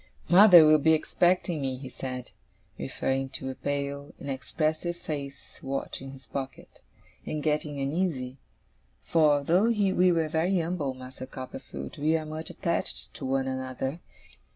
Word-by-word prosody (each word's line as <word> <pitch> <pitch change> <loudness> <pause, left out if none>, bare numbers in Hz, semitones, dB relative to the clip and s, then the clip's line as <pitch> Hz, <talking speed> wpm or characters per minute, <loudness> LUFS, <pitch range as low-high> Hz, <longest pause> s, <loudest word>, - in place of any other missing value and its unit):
'Mother 180 -3 +9
will 155 0 +6
be 160 +2 +4
expecting 175 0 +2
me,' 130 -1 -2
he 130 +1 -8
said, 125 -1 -6 0.5
referring 135 0 -1
to 130 0 -4
a - - -6
pale, 140 +1 -4
inexpressive 155 +5 -2
faced 140 -4 -7
watch 135 0 -4
in 135 - -7
his 135 0 -12
pocket, 135 -1 -7 0.4
'and 150 -1 -4
getting 150 -1 -1
uneasy; 135 -3 -2 0.6
for 150 -3 +3
though 175 +8 +3
we 195 -5 +3
are 165 -2 +2
very 170 +4 +1
umble, 160 -5 -2
Master 130 0 -9
Copperfield, 100 - -8
we 155 +2 +3
are 155 - -5
much 155 +1 -5
attached - - -3
to - - -6
one 135 0 0
another. 130 +3 -3
145 Hz, 145 wpm, -28 LUFS, 130-160 Hz, 0.6 s, Mother